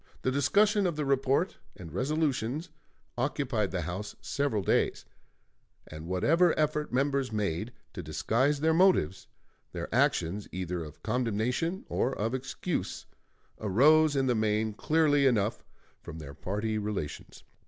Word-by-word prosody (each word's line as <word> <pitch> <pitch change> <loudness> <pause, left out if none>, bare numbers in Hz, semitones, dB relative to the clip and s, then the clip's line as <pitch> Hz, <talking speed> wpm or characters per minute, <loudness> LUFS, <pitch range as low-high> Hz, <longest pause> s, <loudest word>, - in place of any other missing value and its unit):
The 130 - +1
discussion 200 - +3
of 170 - -2
the 150 -1 -2
report 135 +6 +1 0.2
and 85 -4 -10
resolutions 145 - -1 0.5
occupied 125 -6 0
the 90 - -2
House 90 +5 -5
several 140 -8 -1
days, - - +1 0.8
and 75 +1 -9
whatever 165 - +3
effort 150 0 0
members 135 0 0
made 105 0 -2 0.2
to - - -5
disguise 140 +5 0
their 160 +1 +3
motives, 165 - +3 0.5
their - - -5
actions, 100 +5 +1
either 90 -2 -3
of 75 -1 -12
condemnation 125 - -1
or 130 - -1
of 110 +4 -1
excuse, 135 +6 -3 0.5
arose 145 +9 +4
in 135 -1 +2
the 125 - +2
main 110 -1 0
clearly 145 +2 +3
enough 110 -4 +1 0.4
from 80 - -9
their 75 -3 -8
party 105 +7 -2
relations. 100 -8 -5
125 Hz, 130 wpm, -29 LUFS, 105-150 Hz, 0.8 s, arose